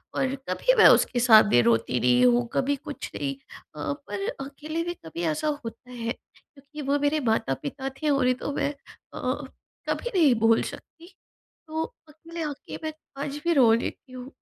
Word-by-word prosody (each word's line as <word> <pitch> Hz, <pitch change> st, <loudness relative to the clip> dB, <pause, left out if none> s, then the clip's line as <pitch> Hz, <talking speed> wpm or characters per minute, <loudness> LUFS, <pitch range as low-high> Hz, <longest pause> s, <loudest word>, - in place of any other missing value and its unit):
और 265 Hz, 0 st, 0 dB
कभी -, -, +2 dB
मैं 445 Hz, -, +9 dB
उसके 245 Hz, -, +4 dB
सामने 215 Hz, -, +6 dB
रोती 115 Hz, +1 st, +2 dB
नहीं 125 Hz, +1 st, +4 dB
हूँ 120 Hz, -1 st, +3 dB
कभी 280 Hz, +2 st, +1 dB
कुछ 285 Hz, +1 st, -8 dB
नहीं 140 Hz, -1 st, -2 dB, 0.4 s
अ, 145 Hz, -1 st, -3 dB
पर 200 Hz, +7 st, -6 dB, 0.2 s
अकेले 305 Hz, +4 st, -5 dB
भी 345 Hz, +1 st, -3 dB
कभी 165 Hz, +2 st, -5 dB
ऐसा 310 Hz, -, -2 dB, 0.2 s
होता 250 Hz, +2 st, -9 dB
है 235 Hz, -2 st, -4 dB
क्योंकि 285 Hz, +4 st, -12 dB
वो 285 Hz, +1 st, +3 dB
मेरे 290 Hz, +2 st, +1 dB
माता-पिता 265 Hz, -, -2 dB
थे 305 Hz, -, +1 dB
और 275 Hz, -2 st, +2 dB
नहीं 255 Hz, 0 st, +3 dB
तो -, -, -2 dB
मैं 285 Hz, -, -1 dB, 1.2 s
कभी 485 Hz, -, -1 dB
नहीं 310 Hz, -8 st, +5 dB
भूल 225 Hz, 0 st, +4 dB
सकती 340 Hz, +3 st, -10 dB, 0.5 s
तो 315 Hz, +1 st, -2 dB, 0.3 s
अकेले 330 Hz, +2 st, -9 dB
आके 295 Hz, -2 st, -6 dB
मैं 315 Hz, 0 st, -3 dB, 0.3 s
आज 285 Hz, 0 st, -4 dB
भी 340 Hz, -, +3 dB
रो 255 Hz, -7 st, +6 dB
लेती 240 Hz, +2 st, -3 dB
हूँ। 255 Hz, +1 st, -9 dB
270 Hz, 170 wpm, -26 LUFS, 215-300 Hz, 1.2 s, मैं